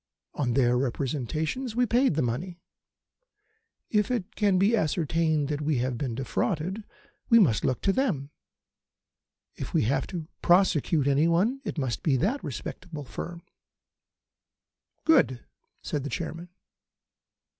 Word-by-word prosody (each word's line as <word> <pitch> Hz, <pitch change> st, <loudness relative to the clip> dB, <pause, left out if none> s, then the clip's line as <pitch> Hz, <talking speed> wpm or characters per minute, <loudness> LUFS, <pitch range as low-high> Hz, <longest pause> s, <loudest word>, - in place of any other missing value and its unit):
On 125 Hz, -5 st, -1 dB
their 125 Hz, -2 st, +3 dB
representations 150 Hz, -, -2 dB
we 245 Hz, +1 st, +3 dB
paid 245 Hz, -, +2 dB
the 155 Hz, -, +1 dB
money. 165 Hz, +10 st, -3 dB, 1.3 s
If 210 Hz, -2 st, +2 dB
it 215 Hz, -4 st, -3 dB
can 200 Hz, -3 st, +3 dB
be 200 Hz, +5 st, +4 dB
ascertained 160 Hz, -4 st, +1 dB
that 150 Hz, -1 st, -2 dB
we 150 Hz, -2 st, +1 dB
have 125 Hz, +1 st, -1 dB
been 120 Hz, -1 st, -3 dB
defrauded 175 Hz, -, -2 dB, 0.5 s
we 230 Hz, -, +7 dB
must 150 Hz, -, +4 dB
look 130 Hz, -, 0 dB
to 195 Hz, -, +2 dB
them. 160 Hz, -, -1 dB, 1.2 s
If -, -, -6 dB
we -, -, +4 dB
have 135 Hz, +5 st, 0 dB
to 170 Hz, -4 st, -6 dB
prosecute 175 Hz, -5 st, +3 dB
anybody 170 Hz, -, +2 dB
it -, -, -4 dB
must 130 Hz, -5 st, -2 dB
be 140 Hz, -5 st, +2 dB
that 225 Hz, -, 0 dB
respectable 150 Hz, +1 st, -6 dB
firm." 170 Hz, +6 st, -7 dB, 1.6 s
"Good," 135 Hz, -, +3 dB, 0.4 s
said 145 Hz, -, -2 dB
the 145 Hz, -, -4 dB
Chairman. 170 Hz, +5 st, -5 dB
160 Hz, 130 wpm, -27 LUFS, 135-195 Hz, 1.6 s, we